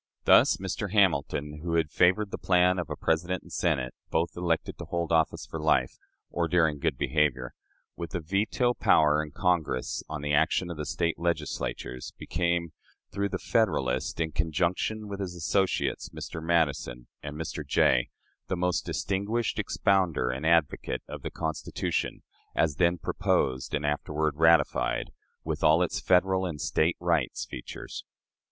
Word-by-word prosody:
Thus, - - +6
Mr. 100 -1 -4
Hamilton, 75 -6 +1
who 85 0 -2
had 80 -3 +1
favored 95 +3 +3
the - - -5
plan 90 0 +3
of 85 - -4
a - - -3
President 85 +3 -1
and - - -13
Senate, 65 -1 0 0.2
both 80 +1 0
elected 85 -2 -1
to - - -6
hold 85 -1 -2
office 80 -1 +1
for 80 - -6
life 70 -5 +1 0.3
(or 85 -1 0
during 80 -4 +2
good - - 0
behavior), 70 -5 0 0.4
with 85 0 -6
a - - 0
veto 105 +8 +1
power 75 -8 +4
in 75 - -8
Congress 85 -7 0
on 75 -2 -5
the 75 0 -1
action 80 +4 +2
of 85 - -6
the 75 - -4
State 85 -1 -1
Legislatures, 75 -6 -3
became, 85 0 -1 0.4
through 100 +1 -1
the - - -2
"Federalist," 70 - 0
in 80 -1 0
conjunction 85 +7 -1
with 100 -1 -6
his 90 -3 -4
associates, 90 0 0
Mr. 80 0 -7
Madison 75 -7 0 0.2
and 75 0 -7
Mr. 80 0 -4
Jay, - - +3 0.4
the 95 - -2
most 90 0 0
distinguished 100 +4 -1
expounder 90 -10 +1
and 65 +5 -3
advocate 80 -4 +1
of - - -7
the - - -4
Constitution, 80 -2 -3 0.3
as 75 -4 +1
then 85 0 +3
proposed 65 -3 0
and 75 0 -2
afterward 75 +1 -1
ratified, 80 -6 +3 0.3
with - - -3
all 80 +3 +5
its 90 - -2
Federal 95 0 +2
and 80 -4 -5
State 80 +3 +1
rights - - 0
features. - - -8
80 Hz, 155 wpm, -28 LUFS, 75-90 Hz, 0.4 s, Thus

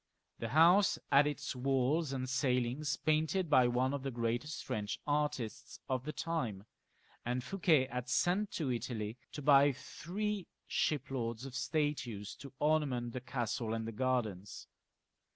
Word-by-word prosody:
The 115 - -3
house 175 - +5
had 145 +1 +6
its 145 -2 -3
walls 135 +4 +1
and 130 -1 -2
ceilings 130 +2 0
painted 155 +3 +1
by 130 -3 +6
one 125 +2 +1
of 140 - -2
the 135 - -3
greatest 120 +4 -2
French 105 -1 -3
artists 145 -6 -2
of 130 -1 -1
the 155 - -2
time, 125 - -3 0.6
and 125 +1 -1
Fouquet 165 -5 +3
had 125 -1 -5
sent 185 +9 +2
to 145 -6 -1
Italy 115 -1 -4
to 150 - -6
buy 140 0 +6
three 195 +8 -4 0.2
shiploads 130 -5 -1
of 135 - -8
statues 130 -8 -2
to 140 - -10
ornament 140 -6 +1
the 125 - -4
castle 120 -3 -2
and 115 0 -3
the - - -3
gardens. 110 -5 -2
130 Hz, 145 wpm, -34 LUFS, 120-150 Hz, 0.6 s, had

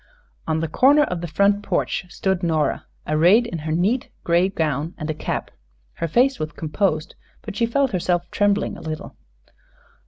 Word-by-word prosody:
On 160 0 0
the 165 - -1
corner 280 - +5
of 180 -10 -3
the 175 - -4
front 200 +5 +2
porch 195 -1 -1
stood 190 0 -1
Nora, 160 -4 0 0.2
arrayed 175 +10 +4
in 175 -8 -5
her 155 +1 -4
neat 195 +10 +1
gray 175 +2 +3
gown 160 -2 -2
and 155 +1 -3
a - - -2
cap. 155 - -4 0.4
Her 165 - -3
face 255 - +2
was 155 +1 -4
composed, 155 0 -1 0.3
but 215 -3 -7
she 230 - +1
felt 275 +2 +1
herself 175 -1 0
trembling 205 0 +1
a - - -10
little. 155 -1 -6
175 Hz, 175 wpm, -22 LUFS, 160-205 Hz, 0.4 s, corner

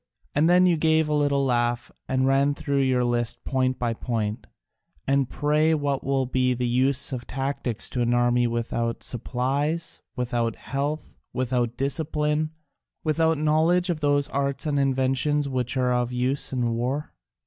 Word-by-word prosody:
And 155 +3 +3
then 180 +1 +6
you 175 -2 +3
gave 160 0 +3
a 150 - -1
little 145 -2 +2
laugh 120 -1 0 0.2
and 130 0 +1
ran 140 +1 +3
through 140 -1 0
your 130 -2 +2
list 120 0 0
point 130 -1 0
by 120 -2 -1
point: 110 -2 -3 0.6
'And 140 -2 +2
pray 150 +2 +2
what 140 -2 -1
will 135 -1 +1
be 125 0 +1
the 125 0 -1
use 130 +3 +1
of 120 -2 -5
tactics 135 -3 -2
to 125 - -1
an 120 0 +1
army 120 0 +3
without 115 0 -2
supplies, 140 +7 -2
without 120 -3 -1
health, 145 +3 -4 0.2
without 125 -2 -1
discipline, 150 +2 0 0.5
without 160 0 +2
knowledge 160 +4 +2
of 165 - -3
those 145 -1 +2
arts 140 +1 -2
and 145 -2 +1
inventions 135 +2 +1
that 130 -1 -2
are 125 -1 +2
of 125 0 0
use 125 +3 -1
in 125 -3 0
war?' 125 +6 -2
135 Hz, 160 wpm, -25 LUFS, 125-145 Hz, 0.6 s, then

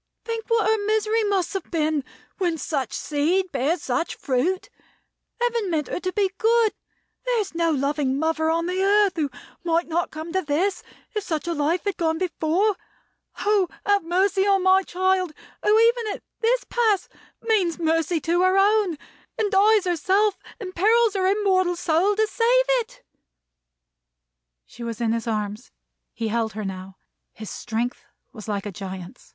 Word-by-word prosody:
Think 455 -1 -4
what 460 -2 +2
her 440 -1 +2
misery 435 +1 +1
must 395 -3 0
have 390 -3 -4
been, 310 -3 0 0.4
when 345 -4 0
such 275 -6 -2
seed 340 +6 0
bears 295 +5 0
such 255 +6 -1
fruit. 315 +8 -1 0.7
Heaven 470 -4 0
meant 310 -4 -1
her - - -2
to 370 0 -2
be 390 -1 +1
good. 455 -1 +3 0.5
There - - +1
is 400 -4 -3
no 335 0 +1
loving 280 -2 0
mother 320 +1 0
on 335 +1 +1
the 365 +2 -1
earth 405 0 +4
who 305 -4 0 0.3
might 335 0 +1
not 335 +1 -1
come 315 +2 -7
to 375 - +1
this, 350 +5 0 0.3
if 425 -2 -2
such 320 -2 -3
a 340 - 0
life 320 +3 0
had 405 -3 -2
gone 320 -1 0
before. 365 +3 0 0.6
Oh, 405 -4 +2 0.2
have 405 -2 +3
mercy 385 +3 +2
on 390 -2 +3
my 375 +1 +5
child, 370 -2 0 0.3
who, 425 +1 +4
even 465 0 +3
at - - -14 0.2
this 485 +2 +2
pass, 440 -5 +1 0.4
means 400 -7 +1
mercy 330 0 +1
to 345 +3 +1
her 370 +1 +3
own, 400 -4 +3 0.4
and 420 -2 0
dies 415 +1 +4
herself, 380 +4 +1 0.2
and 375 -4 -6
perils 440 +4 +3
her 380 -2 +1
immortal 380 -3 +2
soul, 345 +4 +2
to 435 +1 +3
save 485 +3 +2
it!" - - -8 1.6
She - - -14
was 230 -2 -5
in 230 -2 +1
his 230 0 -3
arms. 210 +1 -3 0.4
He 225 -1 -3
held 225 -1 -1
her 215 0 -5
now. 190 0 -7 0.4
His 215 -4 -8
strength 240 +1 -4 0.3
was 215 -3 -10
like 205 -1 -2
a 205 - -4
giant's. 190 +2 -8
360 Hz, 170 wpm, -24 LUFS, 305-410 Hz, 1.6 s, my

